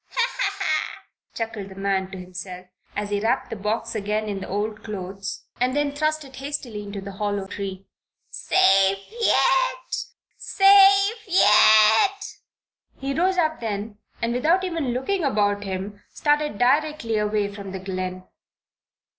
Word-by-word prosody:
"Ha, - - -6 0.2
ha, - - +1
ha!" - - -2 0.3
chuckled 220 -3 -5
the 190 - -12
man 195 -1 -1
to 190 - -8
himself, 180 0 -8 0.3
as 205 0 -3
he 205 - +1
wrapped 225 +3 -1
the - - -3
box 220 +3 -2
up 220 - -3
again 210 +1 -2
in 200 -2 -3
the - - -7
old 210 +2 -3
clothes, 195 -2 -6
and 255 +2 +1
then 290 -1 +1
thrust 310 +1 -1
it 265 -1 -13
hastily 270 -6 -5
into 200 -1 -7
the 200 +1 -7
hollow 205 0 -3
tree. 195 -1 -6 0.5
"Safe 195 - +3
yet! - - +1 0.4
safe 395 +2 +5
yet!" 220 - +5 0.6
He 275 0 -3
rose 365 +5 +1
up 315 -2 +1
then 210 -1 -5 0.2
and 230 0 0
without 325 +9 +2
even 330 -6 -2
looking 320 +10 -1
about 205 -6 +1
him, 195 +2 -5
started 295 -5 0
directly 265 -2 +1
away 210 -1 -1
from 200 -1 -8
the 190 - -5
glen. 185 -1 -5
215 Hz, 150 wpm, -23 LUFS, 200-300 Hz, 0.6 s, safe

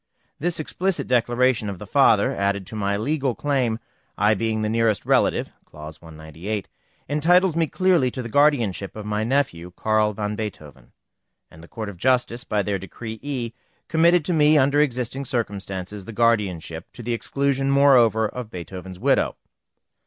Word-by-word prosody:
This 170 +2 -1
explicit 185 +4 -1
declaration 120 -2 +1
of 100 - -5
the - - -9
father, - - +3
added 100 -1 -1
to 110 - -8
my 100 -1 -1
legal 135 +2 -1
claim, 130 -6 0 0.4
I 105 +2 +4
being 110 +1 -1
the - - 0
nearest 115 -2 +1
relative - - +2
(clause 75 0 -11
198), 80 +6 -6 0.4
entitles 170 +4 +3
me 165 -1 +1
clearly 180 -6 +2
to 130 +1 -5
the - - -5
guardianship 115 -8 +1
of 105 -1 -7
my 105 0 -1
nephew, 115 -9 -1
Carl 110 -1 +1
van 105 0 -3
Beethoven; 75 - -8 0.6
and 80 - -14
the - - -13
Court 110 +2 -6
of 100 -3 -8
Justice, 125 +2 +1
by 105 -1 -1
their 100 0 -2
Decree 110 +4 -8
E, 130 -5 -4 0.4
committed 170 0 +4
to 180 - 0
me, 155 -1 +5
under 140 +1 +4
existing 130 -1 -1
circumstances, 100 -5 -4
the 115 - -8
guardianship, 100 -8 0
to 120 - -9
the 120 +1 -2
exclusion 135 +3 -1
moreover 125 -6 +5
of 125 0 -7
Beethoven's 90 0 -8
widow. - - +1
115 Hz, 160 wpm, -23 LUFS, 100-140 Hz, 0.6 s, me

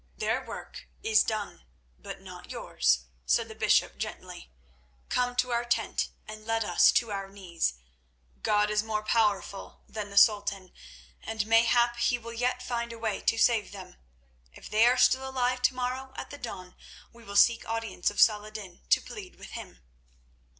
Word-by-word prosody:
"Their - - -1
work - - -9 0.2
is 220 -1 +4
done, 210 - -4 0.4
but - - -8
not - - -11
yours," 65 0 +1 0.2
said - - +2
the - - -9
bishop - - +2
gently. 65 - -7 0.6
"Come 245 0 0
to 250 0 +1
our 235 0 +1
tent 240 0 -1 0.2
and 215 0 -9
let 225 0 0
us - - +5
to 230 -3 +1
our 195 -1 -4
knees. 175 - -2 0.7
God 210 0 +2
is 210 0 +2
more 215 -1 -3
powerful 205 -3 -1
than 210 -2 -6
the 200 - -8
Sultan, 200 -3 +4 0.5
and 220 -2 -3
mayhap 235 +2 +4
He 240 +1 +2
will 230 0 -9
yet 250 +2 -1
find 235 -1 -3
a 230 - -8
way 220 -3 -2
to 225 - +1
save 225 -2 +3
them. 190 - -10 0.5
If - - -13
they 220 +2 +5
are 250 +1 +4
still 265 +1 +3
alive 250 -1 0
tomorrow 255 +1 -1
at - - -7
the 285 - -9
dawn 185 -6 -7 0.4
we 235 0 -16
will 200 -2 -9
seek 230 +3 +4
audience 225 -5 -1
of 205 - -7
Saladin 210 -4 +1
to - - +5
plead 395 -4 -10
with - - -12
him." - - -9
220 Hz, 170 wpm, -28 LUFS, 200-240 Hz, 0.7 s, us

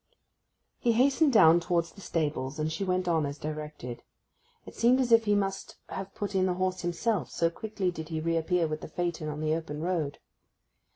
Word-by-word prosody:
He 235 - +2
hastened 275 +5 +4
down 170 -7 +7
towards 170 -1 0
the 200 - -14
stables, 150 -5 -2
and 155 0 -1
she 165 +5 -3
went 185 -1 0
on 165 -2 +2
as 140 0 -3
directed. 150 -5 -6 0.6
It - - -10
seemed 245 +3 +4
as 250 -2 +1
if 230 -1 +6
he 205 -1 +3
must 195 -1 -2
have 195 0 -6
put 205 0 -4
in 190 -1 +2
the 180 - 0
horse 185 0 -1
himself, 175 - -1
so 165 0 +1
quickly 200 -1 -2
did 160 -2 -7
he 160 -1 -2
reappear 165 +2 +1
with 155 -1 -3
the - - -6
phaeton 170 -1 -3
on 150 0 -5
the 155 0 +1
open 160 -2 -4
road. 160 -4 -1
170 Hz, 195 wpm, -29 LUFS, 155-195 Hz, 0.6 s, down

